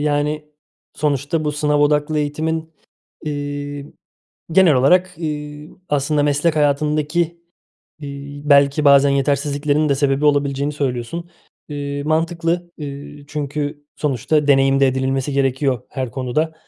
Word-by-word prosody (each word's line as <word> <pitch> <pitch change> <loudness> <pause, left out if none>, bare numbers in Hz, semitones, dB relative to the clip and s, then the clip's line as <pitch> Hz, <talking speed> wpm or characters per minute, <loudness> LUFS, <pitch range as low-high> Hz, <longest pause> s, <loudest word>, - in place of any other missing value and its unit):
yani, 150 +1 -1 0.5
sonuçta 150 +2 -1
bu 150 - 0
sınav 150 0 +1
odaklı 150 +1 +2
eğitimin, 160 +2 -2 0.5
eee, 145 -1 -4 0.7
genel 175 -2 +6
olarak, 180 +8 +3
eee, 150 -2 -5 0.2
aslında 145 +1 +1
meslek 150 +3 +1
hayatındaki, 150 +2 +1 0.8
eee, 140 0 -8
belki 140 +1 +4
bazen 140 0 +6
yetersizliklerin 145 +2 +1
de 140 - +3
sebebi 140 +1 +1
olabileceğini 145 0 +1
söylüyorsun. 140 +5 -3 0.4
Eee, 145 -1 -4
mantıklı, 165 +2 -1
eee, 145 0 -8
çünkü 145 0 -4
sonuçta 150 +2 0
deneyim 135 0 +4
de 135 - +6
edinilmesi 130 +1 -1
gerekiyor, 135 -2 0
her 130 -3 -4
konuda. 135 +6 -1
145 Hz, 115 wpm, -20 LUFS, 140-150 Hz, 0.8 s, genel